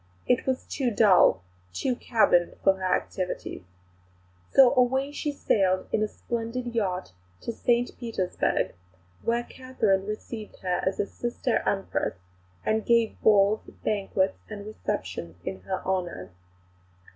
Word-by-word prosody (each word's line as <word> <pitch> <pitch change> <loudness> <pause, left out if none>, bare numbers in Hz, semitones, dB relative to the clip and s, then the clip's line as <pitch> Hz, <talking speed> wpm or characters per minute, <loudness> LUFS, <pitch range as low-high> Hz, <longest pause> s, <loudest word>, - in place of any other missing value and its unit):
It 250 - +2
was 260 -1 0
too 265 -4 -1
dull, 195 - +5 0.3
too 255 - 0
cabined 215 -8 +3
for 195 - +6
her 185 -1 +1
activities. 185 -2 -4 0.9
So 265 -2 +7
away 265 +3 +2
she 295 0 -2
sailed 190 -9 +1
in 215 - +1
a 215 - +2
splendid 235 +2 -4
yacht 185 - -1 0.3
to - - -3
St 240 +1 +1
Petersburg 225 -7 -1 0.5
where 235 +1 0
Catherine 220 -8 -1
received 215 0 -6
her 180 -1 0
as 190 - -1
a - - +2
sister 240 +3 -1
Empress, 195 - -1 0.5
and 220 0 +1
gave 235 -2 +2
balls, 210 0 +5 0.2
banquets, 195 -2 0
and 205 -2 -7
receptions 90 - -4
in 95 0 -4
her 190 - -2
honour. 175 - -2
215 Hz, 130 wpm, -27 LUFS, 190-240 Hz, 0.9 s, So